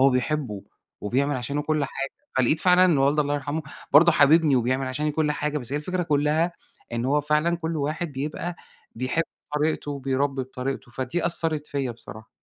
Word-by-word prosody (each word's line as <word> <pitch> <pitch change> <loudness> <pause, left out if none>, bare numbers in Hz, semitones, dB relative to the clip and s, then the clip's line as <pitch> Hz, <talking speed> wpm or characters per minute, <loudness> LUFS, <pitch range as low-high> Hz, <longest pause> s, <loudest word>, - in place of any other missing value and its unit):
هو 135 +1 +6
بيحبه 125 -5 -1 0.4
وبيعمل 135 +6 0
عشانه 140 +4 -2
كل 155 -1 0
حاجة. 135 0 -4 0.3
فلقيت 130 +5 +3
فعلًا 180 0 +5
إن 165 -6 +4
والدي 140 +3 +3
الله 145 0 0
يرحمه 145 +2 -2 0.3
برضه 165 +4 +7
حاببني 150 -1 +5
وبيعمل 130 +2 0
عشاني 150 +4 -1
كل 150 -1 +1
حاجة. 150 0 -2
بس 125 +1 -5
هي - - +1
الفكرة 180 +4 -2
كُلّها، 155 +2 +1 0.4
إنه 120 +2 -1
هو 150 +1 +3
فعلًا 150 +4 +1
كل 165 -1 -3
واحد 155 +2 -2
بيبقى 155 +5 -4 0.4
بيحب 130 +7 0 0.3
طريقته، 150 0 0
وبيربّي 135 0 -1
بطريقته. 130 0 -5
فدي 130 +8 -2
أثّرِت 160 -3 -1
فيّا 140 -4 -2
بصراحة. 110 -2 -11
145 Hz, 175 wpm, -25 LUFS, 130-155 Hz, 0.4 s, برضه